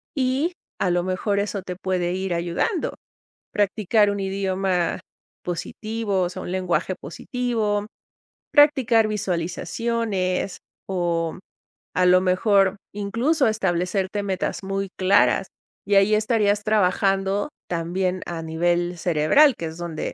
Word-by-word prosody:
y 270 +5 0 0.3
a 185 - +1
lo 175 0 +1
mejor 185 +2 -1
eso 200 -1 -2
te 180 - -5
puede 180 -1 -1
ir 190 -1 -2
ayudando. 175 - -1 0.6
Practicar 205 0 +2
un 200 0 -3
idioma 190 -2 -1 0.4
positivo, 205 +3 -2
o 175 - +1
sea, 180 - -7
un 175 - -5
lenguaje 185 0 0
positivo, 210 - -2 0.7
practicar 260 -7 +5
visualizaciones, 195 +1 -2 0.3
o 170 -3 -1 0.6
a 180 - +3
lo 180 0 +6
mejor, 195 +1 +3 0.2
incluso 230 +8 +1
establecerte 190 0 0
metas 195 0 -2
muy 195 0 -2
claras. 195 0 +3 0.4
Y 205 - +2
ahí 195 +2 +5
estarías 210 -2 +2
trabajando 195 +1 +1 0.2
también 180 +2 -1
a 170 -1 -5
nivel 175 +2 0
cerebral, 175 - +4
que 170 - -4
es 160 - -8
donde 170 -2 -4
195 Hz, 120 wpm, -23 LUFS, 180-215 Hz, 0.7 s, lo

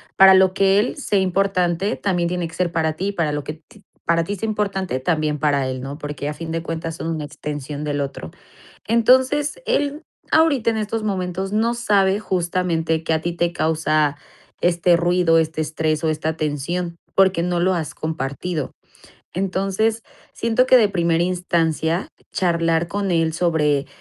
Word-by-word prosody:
para 190 0 +8
lo 190 0 +4
que 195 0 +3
él 220 - 0
sea 235 -7 0
importante, 190 0 +1
también 175 -4 0
tiene 175 -1 -2
que 165 - -14
ser 180 -2 0
para 160 -2 0
ti, 190 +6 -2
para 165 -5 0
lo 145 -1 -3
que 150 - -5
ti 210 - -19 0.2
para 165 0 +2
ti 205 - -3
sea 220 +3 -4
importante, 195 -8 -2
también 155 0 0
para 140 -2 +1
él, 130 -1 -4
¿no? 135 +2 -6
Porque, 145 -1 -5
a - - -3
fin 165 +1 -7
de 165 0 -2
cuentas, 165 -1 -4
son - - -5
una 160 -2 -3
extensión 145 0 -6
del 145 -1 -1
otro. 135 - -5 0.6
Entonces, 260 - +3
él 290 +1 0 0.3
ahorita, 305 -8 +3
en 225 - -3
estos 215 +1 -2
momentos, 190 -1 -2
no 225 +2 +2
sabe, 200 -4 +2
justamente, 170 -4 -1
que 165 - 0
a 160 - 0
ti 175 +1 -2
te 170 0 0
causa 155 -3 +1 0.5
este 175 0 +3
ruido, 175 -1 +3
este 160 0 -1
estrés 155 0 -1
o 160 - +2
esta 155 +1 -2
tensión, 170 +4 -2 0.2
porque 190 -3 +3
no 175 0 0
lo 185 +2 +2
has 160 -4 -3
compartido. 155 +1 -3 0.6
Entonces, 195 +4 0 0.3
siento 230 +2 +1
que 255 - +7
de 220 -4 +5
primera 170 -3 +1
instancia, 170 -1 0 0.2
charlar 170 -2 +1
con 200 +1 -2
él 165 -1 +2
sobre 155 -4 +1
170 Hz, 175 wpm, -21 LUFS, 160-195 Hz, 0.6 s, para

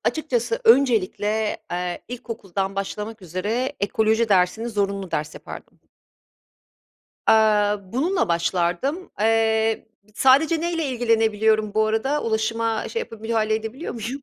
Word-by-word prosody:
açıkçası 315 - -1
öncelikle, 220 - +3 0.2
eee, 180 0 -3
ilkokuldan 195 -6 -4
başlamak 210 +2 -5
üzere 210 - -2
ekoloji 220 +2 +1
dersini 200 +4 +2
zorunlu 200 -3 -2
ders 150 +1 -3
yapardım. - - -11 1.5
Aaa, 210 -2 +3
bununla 335 - 0
başlardım, 175 - -1
eee, 225 0 +2 0.3
sadece 300 +7 +4
neyle 335 -2 -1
ilgilenebiliyorum 220 -3 +1
bu 215 0 +3
arada? 265 +7 0
Ulaşıma 225 0 -1
şey 460 - -3
yapab 225 - -8
müdahale 220 -1 0
edebiliyor 225 +8 -5
muyum? 240 +5 -5
220 Hz, 110 wpm, -23 LUFS, 205-245 Hz, 1.5 s, sadece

